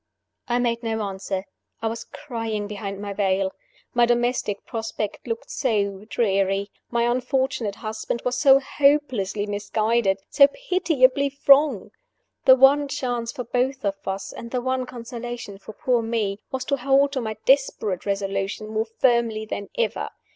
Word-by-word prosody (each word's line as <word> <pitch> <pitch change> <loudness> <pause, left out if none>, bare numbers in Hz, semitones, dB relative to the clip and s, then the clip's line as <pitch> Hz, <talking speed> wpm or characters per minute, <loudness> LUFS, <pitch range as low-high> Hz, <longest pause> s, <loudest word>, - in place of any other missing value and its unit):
I 240 - +1
made 235 -1 0
no 220 -2 -2
answer 195 -1 -4 0.3
I - - -5
was 225 +1 -3
crying 225 -6 -4
behind 200 -1 -5
my 200 0 -5
veil. 190 -1 +1 0.4
My 240 -1 +4
domestic 240 -4 0
prospect 225 -1 -4
looked 230 -1 -4
so 205 -6 -1
dreary! 195 -2 +1 0.2
my 235 -1 +1
unfortunate 250 -3 0
husband 220 +1 -4
was 250 0 +1
so 270 +1 +6
hopelessly 265 -8 +1
misguided, 210 0 0
so 280 - +6
pitiably 280 - +1
wrong! 275 -6 +5 0.5
The 260 - +9
one 275 +2 +5
chance 245 -4 -2
for 250 - -5
both 250 +2 -1
of 200 - +2
us, 195 +1 -4
and 235 - -8
the 250 - -1
one 260 0 -1
consolation 235 -4 -7
for 215 - -10
poor 245 +2 +1
Me, 220 -3 -1
was 265 -1 -3
to 280 - 0
hold 275 +2 +3
to 265 -2 -2
my 220 -2 -4
desperate 260 -9 +2
resolution 195 +1 -2
more 220 0 -1
firmly 230 -2 +1
than 200 -2 -5
ever. 480 - -1
235 Hz, 150 wpm, -24 LUFS, 205-260 Hz, 0.5 s, The